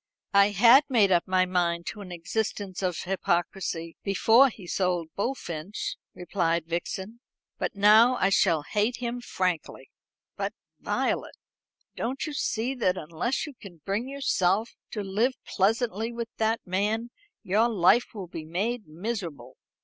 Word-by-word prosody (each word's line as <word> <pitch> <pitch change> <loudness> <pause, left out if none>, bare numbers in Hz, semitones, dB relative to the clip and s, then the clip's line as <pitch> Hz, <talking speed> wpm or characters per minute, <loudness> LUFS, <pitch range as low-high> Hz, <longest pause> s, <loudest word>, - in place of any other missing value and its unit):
"I 200 0 +6
had 235 +7 +7
made 215 -7 +4
up 175 -1 +3
my 185 0 +3
mind 170 -2 0
to 210 - -10
an 185 -2 -9
existence 190 +2 -3
of 180 -3 -1
hypocrisy 175 -2 -2
before 225 +7 +5
he 205 -5 -12
sold 175 -2 -1
Bullfinch," 200 - -3 0.2
replied 170 -2 -1
Vixen, 190 +6 -4 0.4
"but - - -2
now 215 +5 +6
I 195 - +2
shall 170 -6 +3
hate 210 +9 0
him 245 0 -4
frankly." 180 -7 -3 0.4
"But, - - -3 0.2
Violet, - - -1 0.6
don't 260 +3 -3
you 305 - -5
see 245 -2 -1
that 210 -8 0
unless 170 - -2
you 295 - -9
can 180 - -14
bring 205 +6 -1
yourself 225 -6 +1 0.2
to 210 - -4
live 220 +7 +1
pleasantly 225 +2 0
with 235 -1 -5
that 225 +1 +1
man 210 +6 -1 0.3
your 215 +5 +2
life 220 +3 +3
will 200 -3 -5
be 165 -2 -7
made 205 +8 -2
miserable? 165 - -5
200 Hz, 140 wpm, -27 LUFS, 175-230 Hz, 0.6 s, had